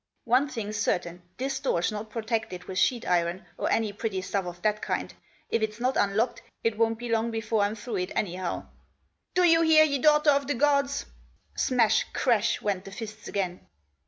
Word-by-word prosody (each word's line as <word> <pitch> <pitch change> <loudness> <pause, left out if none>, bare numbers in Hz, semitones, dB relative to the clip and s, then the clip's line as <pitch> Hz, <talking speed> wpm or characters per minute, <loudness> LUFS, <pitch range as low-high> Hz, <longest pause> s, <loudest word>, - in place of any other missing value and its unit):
" - - -48
One 275 +3 +3
thing's 215 -4 -4
certain, 175 -4 -1 0.2
this 265 +1 -2
door's 220 -9 0
not 215 +1 -5
protected 220 -5 -3
with 185 0 -3
sheet 245 -3 +1
iron, 175 +1 0
or - - -2
any 220 -2 +1
pretty 200 -2 -3
stuff 195 -1 -2
of 175 0 -7
that 215 0 +1
kind. - - -2 0.4
If 230 - +1
it's 215 0 -2
not 255 +2 +1
unlocked 205 +4 +1 0.2
it 230 -1 +1
won't 225 +1 +1
be 240 +1 -6
long 230 0 +1
before 225 -1 -1
I'm 205 +2 +1
through 220 0 -5
it, 180 0 -2
anyhow. 180 -2 -2 0.7
Do 365 - +4
you 330 -1 +6
hear, 320 -1 +7
you 280 -2 0
daughter 300 0 +5
of 280 -1 +1
the 290 - 0
gods?" 280 +1 +2 0.5
Smash, 230 -4 +2
crash 235 -5 +1
went 195 -3 -1
the 195 - -9
fists 215 +1 -8
again. 185 -3 -3
220 Hz, 190 wpm, -27 LUFS, 200-255 Hz, 0.7 s, hear